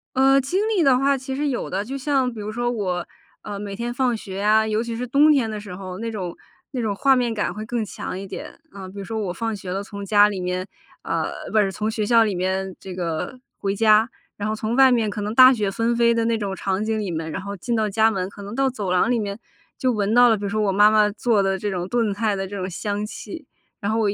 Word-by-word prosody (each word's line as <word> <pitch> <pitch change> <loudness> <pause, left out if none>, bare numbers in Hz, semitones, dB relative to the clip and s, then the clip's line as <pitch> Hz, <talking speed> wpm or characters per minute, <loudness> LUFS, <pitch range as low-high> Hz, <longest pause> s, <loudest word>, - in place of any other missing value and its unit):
呃， 270 +1 +5
经 315 +9 -1
历 420 -5 +2
的 270 -5 +5
话 275 +1 +2
其 265 0 -5
实 295 +2 -1
有 255 - -3
的， 195 +2 -2
就 270 +4 -5
像 270 -2 0
比 225 - -9
如 210 +1 -4
说 240 +2 -1
我， 185 -6 -2 0.4
呃， 205 -1 -6
每 200 -1 -5
天 235 +3 -3
放 245 -1 +1
学 195 -3 -8
呀， 215 +2 +4
尤 215 0 0
其 235 -1 -4
是 245 +2 -3
冬 285 +5 +5
天 265 -7 +2
的 215 -1 -4
时 205 -3 -8
候， 185 -1 -7
那 230 +1 -3
种 185 -5 -5 0.4
那 255 -3 -3
种 215 -3 -1
画 270 +6 +4
面 245 -2 +1
感 210 -4 -1
会 215 +3 -6
更 235 -1 -2
强 190 -2 -6
一 195 - -6
点， 195 - -8
呃， 190 -2 -8
比 195 - -12
如 200 - -5
说 220 +2 -4
我 195 -4 -2
放 225 +2 -3
学 190 -2 -7
了， 195 +2 -2
从 200 -1 -8
家 205 +1 +5
里 205 -2 -4
面， 180 +1 -2 0.4
呃， - - -3
不 220 - +3
是， 195 -2 +2
从 215 +3 -2
学 215 -1 -1
校 230 +1 +5
里 210 -2 0
面 190 +1 -2
这 190 -2 -8
个 175 +7 -3 0.2
回 195 0 -1
家， 215 +2 +4 0.3
然 205 +1 -3
后 215 - -1
从 220 +2 -2
外 265 0 +6
面 230 -3 +2
可 210 - -4
能 210 +1 -3
大 255 +1 +9
雪 210 -5 -1
纷 230 +4 0
飞 235 0 +4
的 230 -1 0
那 230 0 +2
种 200 -3 -3
场 190 +1 -1
景 220 0 -1
里 200 -4 -3
面， 160 -1 -4
然 - - -4
后 200 +1 -6
进 235 +5 -2
到 220 -1 +1
家 220 +2 +3
门， 190 -4 -2
可 200 - -12
能 200 +2 -7
到 270 +1 +2
走 215 -7 -3
廊 185 +7 +3
里 240 - +2
面 200 0 -4 0.4
就 255 - +1
闻 210 -1 0
到 245 0 +7
了， 225 - +4
比 205 - -8
如 200 - -1
说 215 +2 -1
我 200 - +2
妈 205 +2 +6
妈 215 -1 +4
做 215 -1 +1
的 195 0 0
这 205 - -2
种 180 -2 -3
炖 230 0 +1
菜 210 -1 0
的 195 0 -3
这 200 +1 -6
种 185 -1 -3
香 205 +3 -3
气， 305 +8 -8 0.3
然 205 -2 -2
后 225 - +1
我 215 -2 +2
一 - - 0
215 Hz, 300 characters per minute, -23 LUFS, 195-235 Hz, 0.4 s, 大